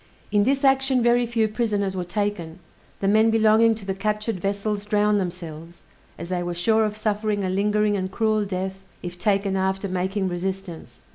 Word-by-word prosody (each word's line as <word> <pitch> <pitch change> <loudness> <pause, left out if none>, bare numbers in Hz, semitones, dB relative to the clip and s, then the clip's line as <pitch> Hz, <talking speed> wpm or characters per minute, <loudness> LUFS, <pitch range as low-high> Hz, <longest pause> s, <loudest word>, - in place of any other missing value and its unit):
In 205 -1 +3
this 275 +2 +1
action 270 -2 +3
very 240 0 +3
few 225 -2 +1
prisoners 210 -3 -1
were 180 - -2
taken: 180 -3 -3 0.4
the 195 - +1
men 220 +2 +4
belonging 225 0 +4
to 210 -2 -10
the 190 - -1
captured 210 +1 -2
vessels 200 +2 -2
drowned 210 0 +2
themselves, 170 -2 -7 0.3
as 170 +2 -7
they 180 -1 -1
were 175 0 -3
sure 220 +5 +2
of 210 0 -3
suffering 210 -1 -1
a 185 - -1
lingering 210 +2 +1
and 185 -1 -2
cruel 215 0 +1
death 190 0 -4 0.2
if 175 0 -7
taken 195 +1 +1
after 190 +1 -1
making 190 +1 -1
resistance. 185 -1 -5
205 Hz, 180 wpm, -23 LUFS, 190-215 Hz, 0.4 s, men